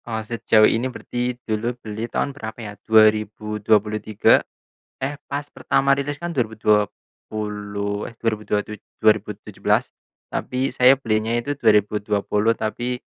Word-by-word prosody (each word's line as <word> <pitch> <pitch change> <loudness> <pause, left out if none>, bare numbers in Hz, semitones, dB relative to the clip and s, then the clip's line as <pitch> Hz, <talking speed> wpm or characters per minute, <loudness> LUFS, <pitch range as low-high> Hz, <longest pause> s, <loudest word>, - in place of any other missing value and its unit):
Eee, 110 -2 -3
sejauh 110 -1 +3
ini 120 +4 +1
berarti, 125 0 -4
dulu 115 +3 -2
beli 110 0 -6
tahun 140 - -1
berapa 110 -5 -7
ya, 110 -3 -7 0.2
2023. 105 -1 +3 0.6
Eh, 140 +2 -2 0.2
pas 145 +1 -3
pertama 140 -1 +1
rilis 140 +1 -3
kan, 175 - -3
dua 140 -8 +1
ribu 110 0 -11
dua 105 -2 +3 0.4
puluh 105 -1 -3
eh, - - -8
dua 115 - 0
ribu 105 - -13
dua 105 - +1
tuj 105 +1 -7 0.2
dua 110 0 +7
ribu - - -6
tujuh - - -15
belas. - - +3 0.4
Tapi, 130 +1 -2
saya 125 +1 +7
belinya 110 -2 0
itu 145 +4 -4
2020, 105 -1 +2
tapi 120 +3 -3
110 Hz, 155 wpm, -22 LUFS, 105-125 Hz, 0.6 s, dua